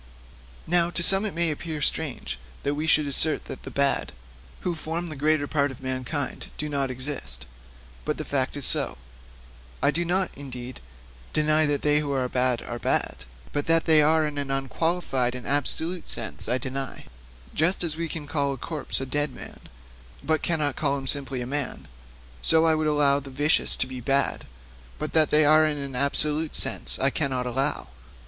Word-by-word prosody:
Now, 175 Hz, 0 st, +3 dB
to 175 Hz, -1 st, -1 dB
some 195 Hz, +4 st, +5 dB
it 205 Hz, -, -4 dB
may 170 Hz, -2 st, +1 dB
seem 160 Hz, 0 st, -5 dB
strange 145 Hz, -, -2 dB, 0.2 s
that 145 Hz, -, 0 dB
we 155 Hz, +2 st, -2 dB
should 155 Hz, -1 st, +4 dB
assert 145 Hz, +2 st, 0 dB
that -, -, -8 dB
the -, -, -8 dB
bad, 140 Hz, -, 0 dB, 0.5 s
who 180 Hz, -, -1 dB
form 165 Hz, +2 st, -3 dB
the 155 Hz, -, -6 dB
greater 150 Hz, +1 st, +2 dB
part 145 Hz, -1 st, +1 dB
of 135 Hz, 0 st, -11 dB
mankind, 130 Hz, +2 st, -3 dB
do 150 Hz, -, -3 dB
not 140 Hz, -2 st, -1 dB
exist. 130 Hz, -, -3 dB, 0.6 s
But -, -, -2 dB
the -, -, -5 dB
fact -, -, -1 dB
is -, -, 0 dB
so. -, -, +2 dB, 0.8 s
I 140 Hz, -, +3 dB
do 170 Hz, +4 st, -1 dB
not, 180 Hz, +2 st, +1 dB
indeed, 125 Hz, -3 st, -8 dB, 0.5 s
deny 155 Hz, 0 st, +3 dB
that 145 Hz, -1 st, -1 dB
they 150 Hz, 0 st, +4 dB
who 145 Hz, -1 st, -2 dB
are 130 Hz, -2 st, 0 dB
bad 125 Hz, -1 st, 0 dB
are 120 Hz, 0 st, -6 dB
bad, -, -, 0 dB, 0.3 s
but 145 Hz, 0 st, -1 dB
that 165 Hz, 0 st, +5 dB
they 155 Hz, -2 st, +6 dB
are 155 Hz, +1 st, +4 dB
in 150 Hz, -1 st, -3 dB
an 140 Hz, -1 st, -3 dB
unqualified 135 Hz, -2 st, 0 dB
and 125 Hz, -, -7 dB
absolute 160 Hz, +4 st, -1 dB
sense 115 Hz, -1 st, -3 dB
I 125 Hz, -, +2 dB
deny. 135 Hz, 0 st, -4 dB, 0.5 s
Just 170 Hz, +4 st, +1 dB
as 160 Hz, -3 st, -1 dB
we 165 Hz, +1 st, -3 dB
call 145 Hz, -2 st, -2 dB
a -, -, -7 dB
corpse 150 Hz, 0 st, -2 dB
a -, -, -2 dB
dead 145 Hz, +2 st, 0 dB
man, -, -, -12 dB, 0.5 s
but 160 Hz, 0 st, +1 dB
cannot 150 Hz, -5 st, +1 dB
call 140 Hz, -2 st, 0 dB
it 135 Hz, -1 st, -2 dB
simply 135 Hz, -3 st, -1 dB
"man," 130 Hz, -, -3 dB, 0.5 s
so 160 Hz, -, +6 dB
I 160 Hz, -, +4 dB
would 155 Hz, 0 st, 0 dB
allow 145 Hz, -2 st, +3 dB
the 140 Hz, -1 st, -10 dB
vicious 145 Hz, +4 st, +3 dB
to -, -, 0 dB
be 130 Hz, -1 st, -7 dB
bad, 135 Hz, +3 st, 0 dB, 0.5 s
but -, -, -4 dB
that 155 Hz, -1 st, +4 dB
they 150 Hz, 0 st, +4 dB
are 155 Hz, +1 st, +6 dB
in 155 Hz, -1 st, +1 dB
an 140 Hz, -2 st, -4 dB
absolute 150 Hz, +3 st, +1 dB
sense -, -, +3 dB
I 135 Hz, +1 st, +2 dB
cannot 130 Hz, -5 st, 0 dB
allow. 130 Hz, -, -1 dB
145 Hz, 185 wpm, -25 LUFS, 135-155 Hz, 0.8 s, they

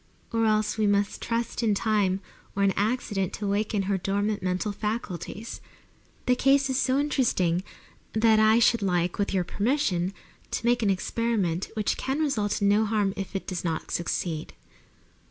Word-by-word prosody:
Or 225 Hz, -1 st, +2 dB
else, 215 Hz, 0 st, +1 dB
we 215 Hz, -, +3 dB
must 205 Hz, 0 st, +1 dB
trust 230 Hz, 0 st, -2 dB
to 225 Hz, -3 st, +2 dB
time 200 Hz, -3 st, +1 dB, 0.3 s
or 200 Hz, -, +1 dB
an 195 Hz, -, +4 dB
accident 205 Hz, -3 st, -1 dB
to 210 Hz, -, -4 dB
awaken 205 Hz, 0 st, 0 dB
her 195 Hz, 0 st, 0 dB
dormant 205 Hz, +2 st, -1 dB
mental 185 Hz, +3 st, -1 dB
faculties. 210 Hz, 0 st, -4 dB, 0.6 s
The 250 Hz, -, +3 dB
case 275 Hz, +1 st, +3 dB
is 265 Hz, -, +1 dB
so 260 Hz, +1 st, +2 dB
interesting 235 Hz, -, +1 dB, 0.5 s
that 220 Hz, 0 st, +4 dB
I 215 Hz, +1 st, +5 dB
should 235 Hz, -1 st, +4 dB
like, 180 Hz, -2 st, 0 dB
with 205 Hz, -, 0 dB
your 185 Hz, -2 st, +1 dB
permission, 200 Hz, -, 0 dB, 0.4 s
to -, -, -3 dB
make 240 Hz, 0 st, +3 dB
an 210 Hz, -, +2 dB
experiment 195 Hz, -3 st, 0 dB
which 215 Hz, -2 st, 0 dB
can 265 Hz, +2 st, -2 dB
result 220 Hz, -10 st, 0 dB
in -, -, +4 dB
no 205 Hz, +2 st, +4 dB
harm 210 Hz, -3 st, +1 dB
if 195 Hz, -1 st, -6 dB
it 195 Hz, -, -3 dB
does 185 Hz, -2 st, -4 dB
not 165 Hz, -2 st, -3 dB
succeed." 170 Hz, -2 st, -2 dB
210 Hz, 170 wpm, -27 LUFS, 195-230 Hz, 0.6 s, I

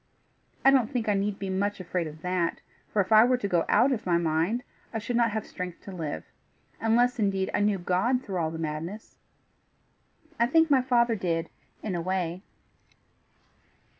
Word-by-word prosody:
I 270 Hz, -, +8 dB
don't 255 Hz, -5 st, +3 dB
think 245 Hz, -5 st, -2 dB
I 210 Hz, -, +3 dB
need 200 Hz, 0 st, -1 dB
be 195 Hz, -1 st, -4 dB
much 200 Hz, +2 st, -1 dB
afraid 180 Hz, -2 st, -2 dB
of 155 Hz, +1 st, -11 dB
that, 180 Hz, -2 st, -1 dB, 0.3 s
for 205 Hz, -, +2 dB
if 190 Hz, -, -16 dB
I 215 Hz, 0 st, +8 dB
were 250 Hz, +1 st, +3 dB
to 205 Hz, -, -2 dB
go 175 Hz, -4 st, +1 dB
out 260 Hz, +3 st, +4 dB
of 230 Hz, -4 st, -1 dB
my 175 Hz, -2 st, +2 dB
mind, 170 Hz, +8 st, 0 dB, 0.3 s
I 225 Hz, -, -3 dB
should 230 Hz, +2 st, -3 dB
not 235 Hz, -1 st, +3 dB
have 220 Hz, 0 st, -3 dB
strength 180 Hz, -1 st, -6 dB
to 195 Hz, -, -9 dB
live 165 Hz, -5 st, -4 dB, 0.6 s
unless 240 Hz, +2 st, +2 dB
indeed 195 Hz, -2 st, 0 dB
I -, -, +1 dB
knew 205 Hz, -1 st, +2 dB
God 190 Hz, +9 st, +1 dB
through 195 Hz, -7 st, -4 dB
all 160 Hz, -2 st, 0 dB
the 160 Hz, -, -6 dB
madness. 165 Hz, +6 st, -5 dB, 1.2 s
I 235 Hz, -, +4 dB
think 320 Hz, +3 st, +3 dB
my 270 Hz, -2 st, +5 dB
father 240 Hz, -2 st, +2 dB
did 170 Hz, -4 st, -2 dB, 0.3 s
in 210 Hz, -, -2 dB
a 175 Hz, -, -1 dB
way." 180 Hz, 0 st, -2 dB
200 Hz, 190 wpm, -27 LUFS, 175-235 Hz, 1.2 s, I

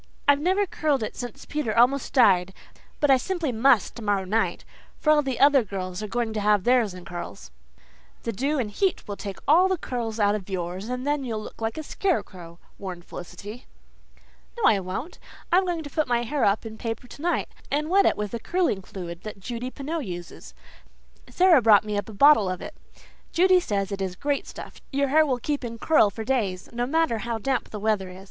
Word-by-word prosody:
I've 285 Hz, 0 st, +5 dB
never 375 Hz, +6 st, +2 dB
curled 300 Hz, -, 0 dB
it -, -, -5 dB
since 245 Hz, +3 st, -7 dB
Peter 290 Hz, -8 st, -2 dB
almost 255 Hz, +4 st, +3 dB
died, 190 Hz, -7 st, +4 dB, 0.4 s
but 295 Hz, -2 st, +3 dB
I 265 Hz, -, +7 dB
simply 335 Hz, +1 st, -2 dB
must 235 Hz, -2 st, +3 dB
tomorrow 205 Hz, -4 st, -1 dB
night, 220 Hz, +4 st, -1 dB, 0.3 s
for 305 Hz, -, +2 dB
all 300 Hz, -1 st, +5 dB
the 265 Hz, -3 st, -3 dB
other 280 Hz, -2 st, +6 dB
girls 185 Hz, -2 st, -5 dB
are 215 Hz, -, -4 dB
going 230 Hz, 0 st, -2 dB
to 215 Hz, -, -2 dB
have 205 Hz, -2 st, +3 dB
theirs 240 Hz, -5 st, +2 dB
in 180 Hz, -1 st, -11 dB
curls." 100 Hz, -, -8 dB, 0.7 s
"The 230 Hz, -, -2 dB
dew 275 Hz, +8 st, -1 dB
and 225 Hz, -6 st, -2 dB
heat 385 Hz, -, -1 dB
will 205 Hz, -, -4 dB
take 200 Hz, -1 st, -6 dB
all 340 Hz, +6 st, +6 dB
the 375 Hz, -1 st, 0 dB
curl 240 Hz, -7 st, -3 dB
out 205 Hz, -1 st, +3 dB
of 205 Hz, -2 st, -5 dB
yours 185 Hz, +3 st, -4 dB
and 250 Hz, +1 st, -3 dB
then 290 Hz, -1 st, 0 dB
you'll 220 Hz, -4 st, -3 dB
look -, -, -11 dB
like 225 Hz, +3 st, -2 dB
a 315 Hz, -, -4 dB
scarecrow," 185 Hz, -, -3 dB, 0.2 s
warned 180 Hz, -3 st, -7 dB
Felicity. 200 Hz, +7 st, -9 dB, 0.9 s
"No, 470 Hz, -, -4 dB
I 210 Hz, -, +4 dB
won't. 190 Hz, -, -6 dB, 0.3 s
I'm 370 Hz, +2 st, +4 dB
going 345 Hz, -3 st, -2 dB
to 290 Hz, -, -8 dB
put 310 Hz, -1 st, 0 dB
my 240 Hz, -1 st, +1 dB
hair 270 Hz, +1 st, 0 dB
up 205 Hz, +3 st, +1 dB
in 220 Hz, 0 st, -8 dB
paper 230 Hz, +2 st, -4 dB
tonight 335 Hz, +7 st, -2 dB, 0.2 s
and 300 Hz, +2 st, 0 dB
wet 390 Hz, +3 st, +4 dB
it -, -, +1 dB
with 210 Hz, +1 st, -4 dB
a 235 Hz, -, -2 dB
curling 345 Hz, -, 0 dB
fluid 175 Hz, -2 st, -8 dB
that 210 Hz, -1 st, -8 dB
Judy 240 Hz, +4 st, -5 dB
Pineau 295 Hz, +5 st, -4 dB
uses. 175 Hz, -, -8 dB, 0.7 s
Sara 360 Hz, -6 st, +5 dB
brought 215 Hz, -2 st, +6 dB
me 210 Hz, -1 st, -3 dB
up 205 Hz, +1 st, -3 dB
a -, -, -8 dB
bottle 275 Hz, -5 st, +6 dB
of 185 Hz, -1 st, -3 dB
it. -, -, -8 dB, 0.6 s
Judy 365 Hz, +1 st, +5 dB
says 200 Hz, -, -2 dB
it 195 Hz, -1 st, -4 dB
is 185 Hz, -1 st, -3 dB
great 285 Hz, +7 st, -2 dB
stuff -, -, -10 dB
your 280 Hz, 0 st, +1 dB
hair 310 Hz, +2 st, +4 dB
will 255 Hz, -3 st, +1 dB
keep 285 Hz, +3 st, -3 dB
in 230 Hz, -1 st, -5 dB
curl 265 Hz, -4 st, +4 dB
for 220 Hz, +3 st, -6 dB
days, 210 Hz, -7 st, -1 dB
no 240 Hz, +1 st, -1 dB
matter 320 Hz, -5 st, +1 dB
how 235 Hz, 0 st, -3 dB
damp 260 Hz, +4 st, -1 dB
the 210 Hz, -, -6 dB
weather 205 Hz, -3 st, 0 dB
is. 185 Hz, 0 st, -11 dB
235 Hz, 210 wpm, -25 LUFS, 200-290 Hz, 0.9 s, I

